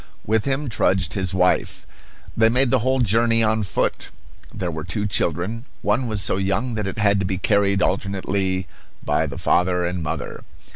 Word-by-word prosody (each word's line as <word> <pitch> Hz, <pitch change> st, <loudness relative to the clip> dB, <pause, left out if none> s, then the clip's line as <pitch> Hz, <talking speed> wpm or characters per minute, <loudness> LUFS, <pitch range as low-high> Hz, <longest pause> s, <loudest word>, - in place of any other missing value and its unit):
With 110 Hz, 0 st, +1 dB
him 140 Hz, +2 st, -1 dB
trudged 95 Hz, -5 st, +1 dB
his 95 Hz, -2 st, -1 dB
wife. 90 Hz, -1 st, +1 dB, 0.5 s
They 110 Hz, 0 st, +5 dB
made 125 Hz, +1 st, +2 dB
the 130 Hz, -, +4 dB
whole 130 Hz, +3 st, +1 dB
journey 115 Hz, +1 st, +3 dB
on 110 Hz, 0 st, +1 dB
foot. 95 Hz, -, -1 dB, 0.4 s
There 90 Hz, -2 st, -3 dB
were 80 Hz, -1 st, -5 dB
two 105 Hz, +5 st, -2 dB
children. 100 Hz, -, -1 dB, 0.2 s
One 110 Hz, +5 st, +1 dB
was 105 Hz, -3 st, -2 dB
so -, -, 0 dB
young 100 Hz, +6 st, -1 dB
that 105 Hz, -2 st, -2 dB
it 95 Hz, -, -5 dB
had 100 Hz, -2 st, +3 dB
to 95 Hz, -, -1 dB
be 95 Hz, 0 st, -2 dB
carried 100 Hz, 0 st, +2 dB
alternately 95 Hz, -1 st, -1 dB, 0.4 s
by -, -, +1 dB
the -, -, -7 dB
father 90 Hz, 0 st, +1 dB
and 90 Hz, 0 st, -3 dB
mother. 75 Hz, -, -4 dB
100 Hz, 180 wpm, -22 LUFS, 95-115 Hz, 0.5 s, They